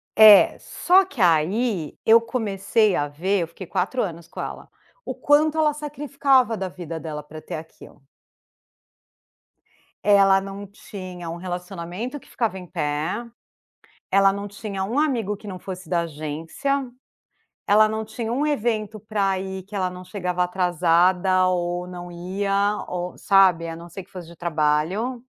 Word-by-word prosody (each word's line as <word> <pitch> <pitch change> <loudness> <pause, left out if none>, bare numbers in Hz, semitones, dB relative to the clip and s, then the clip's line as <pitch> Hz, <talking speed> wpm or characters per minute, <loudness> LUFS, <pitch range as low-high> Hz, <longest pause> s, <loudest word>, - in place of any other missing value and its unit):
É, 215 -2 +8
só 370 +2 +3
que 285 -9 -13
aí 175 +2 +1
eu 230 +1 +7
comecei 215 -3 +1
a 145 - 0
ver 185 +8 -1
Eu 165 - -2
fiquei 170 +3 -10
4 200 +9 -1
anos 170 -4 -6
com - - -11
ela. - - -7 0.3
O - - -5
quanto 305 +2 +3
ela 305 -2 +3
sacrificava 280 -4 +1
da 190 -3 -4
vida 170 -2 -7
dela 150 -2 -6
pra 155 +1 -11
ter - - -6
aquilo. 155 -2 -12 2.0
Ela 195 -1 +5
não 195 +1 -7
tinha 185 -3 -9
um 170 - -5
relacionamento 180 +7 -5
que - - -21
ficava 225 -5 -1
em 180 - -11
pé, 150 +9 -2 0.9
ela 195 0 +5
não 200 +1 -5
tinha 200 -2 -5
um 230 +7 -3
amigo 235 -9 +1
que 210 0 -11
não 185 - -6
fosse 185 -2 -8
da 170 0 +1
agência, 165 - -3 0.8
ela 215 +1 +6
não 220 0 -3
tinha 220 +1 -4
um 275 +5 0
evento 220 -7 -1
pra 200 -2 -1
ir 190 0 -5
que 205 +2 -9
ela 185 -2 0
não 180 0 -9
chegava 180 -1 -2
atrasada 180 +1 +2
ou 175 0 -1
não 175 -1 -8
ia, 195 +4 -1
ou 180 0 -4
sabe, 185 -4 +4
a 165 - -5
não 170 +1 -10
ser 195 - -8
que 180 - -23
fosse 180 -3 -9
de 170 - -13
trabalho. 170 +10 0
190 Hz, 160 wpm, -23 LUFS, 175-220 Hz, 2.0 s, É